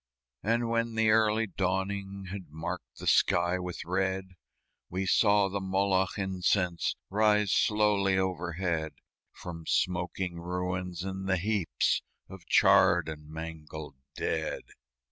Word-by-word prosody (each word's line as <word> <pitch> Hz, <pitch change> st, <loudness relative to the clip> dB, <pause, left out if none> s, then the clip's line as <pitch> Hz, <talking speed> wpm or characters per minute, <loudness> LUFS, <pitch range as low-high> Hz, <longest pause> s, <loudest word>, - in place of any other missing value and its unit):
And 115 Hz, +2 st, +1 dB
when 115 Hz, 0 st, 0 dB
the 110 Hz, -1 st, +3 dB
early 110 Hz, 0 st, +3 dB
dawning 95 Hz, 0 st, -2 dB
Had 95 Hz, -5 st, -7 dB
marked 80 Hz, +2 st, -6 dB
the -, -, -8 dB
sky 85 Hz, +1 st, +3 dB
with 90 Hz, -3 st, -5 dB
red, 95 Hz, +1 st, -1 dB, 0.6 s
We 95 Hz, +2 st, -2 dB
saw 100 Hz, +1 st, +4 dB
the 100 Hz, 0 st, -3 dB
Moloch 95 Hz, 0 st, +1 dB
incense 90 Hz, -2 st, 0 dB, 0.2 s
Rise 105 Hz, -1 st, +3 dB
slowly 105 Hz, -3 st, +3 dB
overhead 85 Hz, -3 st, -1 dB, 0.4 s
From 85 Hz, -2 st, -9 dB
smoking 90 Hz, 0 st, -1 dB
ruins 90 Hz, 0 st, -3 dB
and 95 Hz, 0 st, -4 dB
the 95 Hz, -, +3 dB
heaps 100 Hz, -2 st, 0 dB, 0.3 s
Of 95 Hz, -3 st, -12 dB
charred -, -, +5 dB
and 75 Hz, -1 st, -8 dB
mangled 80 Hz, -2 st, -8 dB, 0.2 s
dead. -, -, -2 dB
95 Hz, 120 wpm, -29 LUFS, 85-100 Hz, 0.6 s, charred